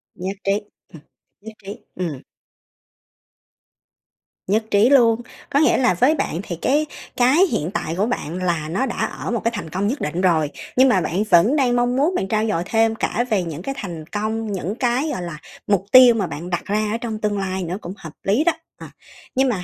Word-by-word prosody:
Nhất 190 +2 -5
trí, 195 - +1 0.4
ừm, 160 - -13 0.4
nhất 220 +1 -10
trí, 200 +2 -7 0.2
ừm. 165 -7 -4 2.3
Nhất 215 +4 +2
trí 210 +5 +5
luôn, 235 -4 +5 0.3
có 280 - +2
nghĩa 310 - +4
là 250 -7 +3
với 260 - +3
bạn 180 - -2
thì 170 - -5
cái 290 - +1 0.3
cái 255 +4 +4
hiện 160 +5 -1
tại 165 -5 -2
của 205 - +2
bạn 180 -8 -3
là 170 -4 -1
nó 195 +11 0
đã 240 - -4
ở - - -3
một 235 - -2
cái 230 - +1
thành 205 - -5
công 190 +5 -1
nhất 265 +6 -2
định 170 +5 -2
rồi, 160 -5 +2 0.3
nhưng 260 +1 +5
mà 190 -6 +3
bạn 175 +5 -1
vẫn 215 - +4
đang 255 -4 +2
mong 245 0 +1
muốn 310 +8 +1
bạn 190 - -1
trau 215 +2 0
dồi 190 -6 0
thêm 225 +1 +2
cả 240 +1 -1
về 200 -5 +1
những 165 -1 -6
cái 275 +7 -4
thành 170 - -6
công, 215 +2 -3
những 190 +1 -3
cái, 255 +4 0
gọi 215 - -3
là, 170 -3 -6 0.3
mục 195 -2 +1
tiêu 255 -2 +8
mà 195 -5 -1
bạn 170 +4 -7
đặt 175 - -2
ra 210 +1 0
ở 225 - 0
trong 230 -2 -5
tương 210 -1 -1
lai 190 -1 -2
nữa 180 +3 -3
cũng 175 +2 -7
hợp 160 -6 -10
lý 215 +10 +2
đó, 345 - +3 0.3
ờ. - - -7 0.5
Nhưng 265 0 +3
mà 190 -6 -2
210 Hz, 215 wpm, -21 LUFS, 180-245 Hz, 2.3 s, tiêu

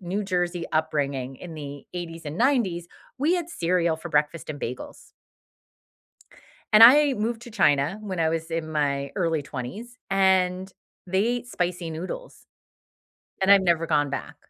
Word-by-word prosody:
New 190 +3 -3
Jersey 175 -2 -1
upbringing 140 -4 -1
in 175 +2 -9
the 145 -2 -8
'80s 165 -2 -6
and 150 +3 -6
'90s 225 -10 +1 0.3
we 315 +6 +2
had 345 -2 -2
cereal 170 - +1
for 175 +2 -8
breakfast 150 +1 0
and 145 -2 -5
bagels. 125 +2 -7 1.6
And 215 - +8
I 280 +3 +8
moved 225 +2 -3
to 240 - -11
China 145 +2 +2
when 190 -4 -5
I 160 -1 +2
was 165 0 -3
in 165 -1 -3
my 140 -2 -1
early 165 -5 0
20s 200 - -7
and 190 -1 +2 0.3
they 190 +1 0
ate 245 +1 -1
spicy 175 -5 -3
noodles, 185 - -7 1.0
and 190 - +3
I've 200 -1 +8
never 170 -2 +2
gone 145 -2 +2
back. - - -5
175 Hz, 155 wpm, -25 LUFS, 155-200 Hz, 1.6 s, And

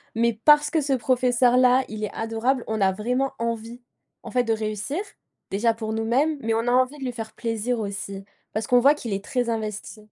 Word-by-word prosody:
mais 235 0 +2
parce 295 0 +6
que 320 -2 +2
ce 275 -1 0
professeur 250 0 +2
là 255 +1 +5
il 215 0 -6
est 210 - -2
adorable, 225 +3 -1
on 220 -2 -2
a 190 0 +4
vraiment 250 +7 -1
envie 230 +1 -4 0.4
en - - -8
fait 250 -1 +2
de 225 -1 +1
réussir. 215 - -3 0.5
Déjà 225 +4 +2
pour 220 -1 -4
nous 225 0 -1
mêmes, 285 +6 +1
mais 225 0 0
on 230 +2 -1
a - - +3
envie 255 +3 +2
de 270 - -8
lui 250 - -2
faire 225 -2 -7
plaisir 230 +1 -2
aussi, 200 -1 -5 0.3
parce 215 +1 -2
qu'on 245 0 +5
voit 280 +4 +5
qu'il 230 -8 -5
est 195 0 -3
très 245 +1 -1
investi. 215 0 -5
235 Hz, 220 wpm, -24 LUFS, 220-255 Hz, 0.5 s, parce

